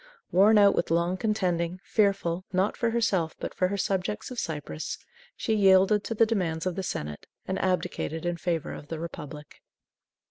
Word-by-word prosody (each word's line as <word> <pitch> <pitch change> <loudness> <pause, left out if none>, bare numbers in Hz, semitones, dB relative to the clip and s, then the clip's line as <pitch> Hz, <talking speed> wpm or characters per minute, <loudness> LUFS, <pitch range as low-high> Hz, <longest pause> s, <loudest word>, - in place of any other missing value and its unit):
Worn 205 +4 +6
out 200 -1 +6
with - - 0
long 170 +2 +1
contending, 185 -4 -1
fearful, 195 -4 +1
not 190 +2 +1
for 235 - 0
herself 210 -8 0
but - - -5
for 185 - +1
her 200 +2 -2
subjects 195 +4 -2
of 250 - -4
Cyprus, 155 0 -4 0.4
she 220 - -1
yielded 195 0 +5
to 225 - -3
the 230 - +5
demands 180 -7 -1
of 185 - 0
the 190 - -2
senate, 75 - -5 0.2
and 190 - -1
abdicated 180 -3 -1
in 175 0 -1
favor 170 -2 -2
of 145 - -9
the 165 - -4
Republic. 150 -3 -8
185 Hz, 175 wpm, -27 LUFS, 170-200 Hz, 0.4 s, Worn